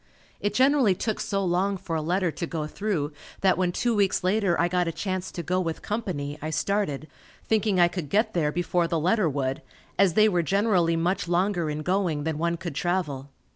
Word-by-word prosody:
It 205 - -2
generally 260 -6 +4
took 220 +3 -2
so 195 -1 -1
long 190 +3 +1
for 165 -2 -4
a 160 - 0
letter 175 +2 0
to 170 - -4
go 160 -2 -3
through 155 -3 -2 0.3
that 190 -1 +4
when 180 -1 +1
two 240 +6 0
weeks 200 -3 +2
later 190 -1 +2
I 170 - +3
got 180 0 0
a - - 0
chance 185 +1 -3
to 170 - -5
go 180 +2 0
with 165 -2 -4
company, 155 -10 -3
I 155 - -3
started, 160 -4 -1 0.4
thinking 215 -3 +1
I 175 - +7
could 175 -4 -5
get 215 - +1
there 155 -4 +1
before 175 +1 0
the 165 -1 0
letter 185 +2 +2
would, 135 -2 -2 0.4
as 190 -4 +4
they 215 0 +6
were 180 -5 +2
generally 185 -2 +2
much 175 +3 0
longer 175 -1 +1
in 150 0 -3
going 180 -4 0
than 155 -1 -2
one 170 +1 0
could 170 -2 -5
travel. 145 -4 -2
180 Hz, 210 wpm, -26 LUFS, 160-195 Hz, 0.4 s, I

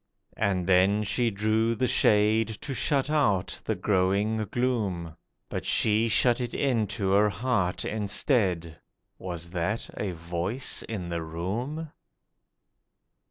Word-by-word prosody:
And 95 -4 0
then 95 +3 +4
she 115 +3 +1
drew 110 +2 +1
the 130 - 0
shade, 110 -1 +3
to 140 - -4
shut 140 +1 0
out 105 -12 +1
the - - 0
growing 100 +2 +1
gloom, 100 -10 -1 0.3
But - - -4
she 110 +1 +2
shut 120 +2 +3
it 120 -1 -4
into 110 -7 0
her 105 +2 +4
heart 100 -2 -1
instead. 95 - 0 0.4
(Was 85 -2 -6
that 95 +6 -2
a 100 -3 -3
voice 85 +9 -2
in 100 -6 -4
the 85 -1 -2
room?) 115 - -4
105 Hz, 120 wpm, -27 LUFS, 90-115 Hz, 0.4 s, then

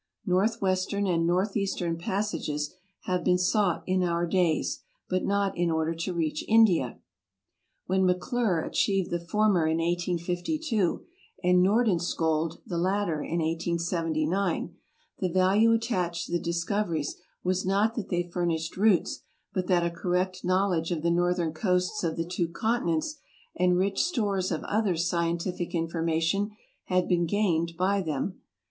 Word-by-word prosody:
Northwest 185 0 +1
ern 200 0 0
and 165 -3 +1
northeastern 185 -1 0
passages 170 -5 -2 0.3
have 180 -2 -1
been 180 0 +3
sought 185 0 +1
in 185 0 +1
our 170 -1 +1
days, 175 -2 +1 0.3
but 185 0 0
not 200 -1 0
in 175 0 +1
order 160 0 0
to 165 +3 -3
reach 160 -3 -1
India. 205 - +4 0.9
When 190 +1 +1
Maclure 180 -1 +1
achieved 195 -2 0
the 175 - 0
former 190 -2 +2
in 160 0 +1
1852 175 - -1 0.4
and 180 0 +4
Nordenskjold 175 -6 +1
the 170 - -3
latter 185 -4 0
in 170 +2 -2
1879, 170 +1 -1 0.4
tne 185 -2 -1
value 195 +5 +4
attached 185 -7 0
to - - -10
the 175 - +1
discoveries 170 -2 -1 0.3
was 185 +1 0
not 200 +4 +2
that 225 -4 -5
they 175 -1 +1
furnished 170 -2 -2
routes, 205 -2 +2 0.3
but 185 -2 -1
that 175 -2 +3
a 170 - 0
correct 180 +2 -1
knowledge 185 -2 +1
of 165 -3 -2
the 170 - +2
northern 175 -1 +1
coasts 180 +3 0
of 165 -1 -1
the 165 - -1
two 175 0 -1
continents 220 - -1 0.4
and 180 0 +3
rich 195 +2 +1
stores 205 - 0
of 160 - -2
other 210 -4 0
scientific 170 +1 -1
in 165 -1 0
formation 165 +4 0 0.4
had 185 -1 +1
been 175 -1 +2
gained 170 -4 +1
by 195 +2 +2
them. 160 +2 -3
180 Hz, 145 wpm, -27 LUFS, 170-195 Hz, 0.9 s, India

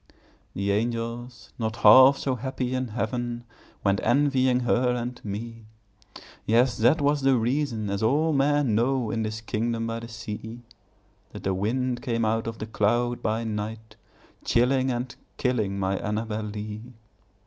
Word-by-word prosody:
The 100 +1 0
angels, 115 0 -3
not 110 -2 -2
half 130 +3 +8
so 135 - -1
happy 130 0 -3
in 130 0 -1
heaven, 120 +1 -3 0.4
Went 100 0 +2
envying 130 0 +2
her 125 0 +2
and 125 +1 -5
me; 110 +2 -6 0.8
Yes, 120 +3 +3
that 120 +7 +4
was 145 0 +2
the 135 -1 +4
reason 120 -2 -1
(as 100 0 -2
all 150 +8 +2
men 145 -3 +2
know, 120 +1 +1
In 115 - -1
this 110 0 -3
kingdom 115 +1 -2
by 115 0 -3
the 115 - -8
sea) 110 +1 -7 0.7
That 105 - -8
the 95 - 0
wind 120 +6 -1
came 115 -2 -1
out 110 +1 0
of 115 -1 -4
the - - -5
cloud 120 +3 0
by 110 +2 -1
night, 110 0 -5 0.5
Chilling 130 +2 +2
and 125 +1 -3 0.2
killing 110 -7 0
my 95 0 -1
Annabel 110 +1 -3
Lee. 105 0 -6
115 Hz, 150 wpm, -26 LUFS, 110-125 Hz, 0.8 s, half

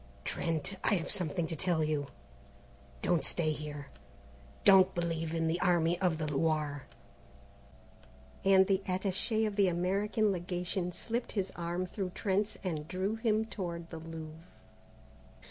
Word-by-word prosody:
"Trent, 165 +3 -2
I 210 - +4
have 175 -2 -2
something 175 -3 0
to 160 - -4
tell 170 -1 +1
you. 150 -2 0 1.0
Don't 170 -5 +2
stay 155 +2 +1
here, 150 -2 -6 0.7
don't 195 -2 +7
believe 165 -1 -1
in 165 0 +1
the 165 +2 0
Army 175 -1 +2
of 175 -4 +2
the 155 - -2
Loire:" 150 -1 0 1.6
and 190 -1 +6
the 195 0 +2
attaché 195 +4 +1
of 210 -1 -3
the 200 -2 +5
American 200 +5 +1
Legation 180 0 -2
slipped 235 +6 -3
his 195 -3 -1
arm 175 +1 -2
through 185 0 -4
Trent's 205 +2 0
and 155 -5 -3
drew 190 +4 -1
him 220 -1 +1
toward 170 -6 -5
the 165 - -6
Louvre. 160 0 -8
175 Hz, 140 wpm, -32 LUFS, 160-195 Hz, 1.6 s, don't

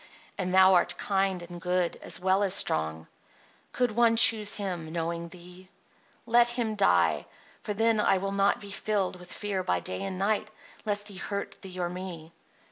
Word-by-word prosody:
And 185 -2 -3
thou 190 0 +6
art 175 0 +2
kind 195 -2 -1
and 175 0 -10
good, 180 -1 0
as - - -4
well 190 +2 +1
as 200 -1 +2
strong. 80 - +1 0.7
Could 245 -2 0
one 230 +1 +3
choose 220 -2 +6
him, 180 -6 -4
knowing 170 0 -4
thee? 180 +2 -14 0.6
Let 240 0 +4
him 240 -2 -2
die; 200 -2 +2 0.3
for 210 - -4
then 225 +1 +2
I 195 - +3
will 195 +1 -3
not 200 0 +1
be 200 -1 -10
filled 200 -3 -2
with 180 0 -13
fear 205 -3 -3
by 90 - 0
day 90 +1 -5
and 190 -1 -4
night 210 +2 -1 0.4
lest 205 0 -1
he 200 - -10
hurt 200 +1 -5
thee 185 -2 -10
or 175 - -1
me." 175 -3 -8
190 Hz, 180 wpm, -27 LUFS, 175-205 Hz, 0.7 s, thou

